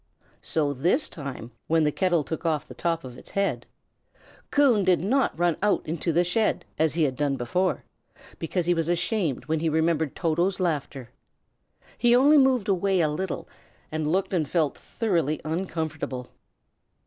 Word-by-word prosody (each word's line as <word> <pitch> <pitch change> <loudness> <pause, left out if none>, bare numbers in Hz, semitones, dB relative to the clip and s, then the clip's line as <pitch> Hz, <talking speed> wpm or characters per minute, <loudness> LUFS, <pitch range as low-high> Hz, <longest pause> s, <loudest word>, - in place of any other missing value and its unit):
So 150 -3 0
this 165 - +2
time, 135 -5 -7 0.2
when 165 0 +3
the 150 - +2
kettle 175 -2 +1
took 160 +5 -5
off 160 -3 -1
the - - -10
top 165 -1 -1
of 125 -2 -9
its - - -15
head, 200 0 0 0.8
Coon 260 -8 +4
did 185 -1 +3
not 250 +5 +1
run 175 -1 +1
out 210 0 +1
into 165 +2 -2
the 170 +2 +3
shed, 215 +5 0
as 160 -1 +2
he 165 - +2
had 135 -3 0
done 145 0 0
before, 180 +10 -1 0.6
because 170 +1 -1
he 175 - +3
was 165 -1 -1
ashamed 175 - 0
when 160 0 0
he 165 +1 0
remembered 160 -2 +1
Toto's 175 +3 0
laughter. 145 -7 -2 0.9
He 240 +1 +5
only 285 +4 +6
moved 260 -5 +3
away 195 -1 +1
a 155 - +2
little, 170 +4 -4 0.4
and 155 -1 -1
looked 190 +2 0
and 155 -6 0
felt 160 -5 +1
thoroughly 165 - -1
uncomfortable. 155 -6 -4
165 Hz, 165 wpm, -26 LUFS, 150-190 Hz, 0.9 s, only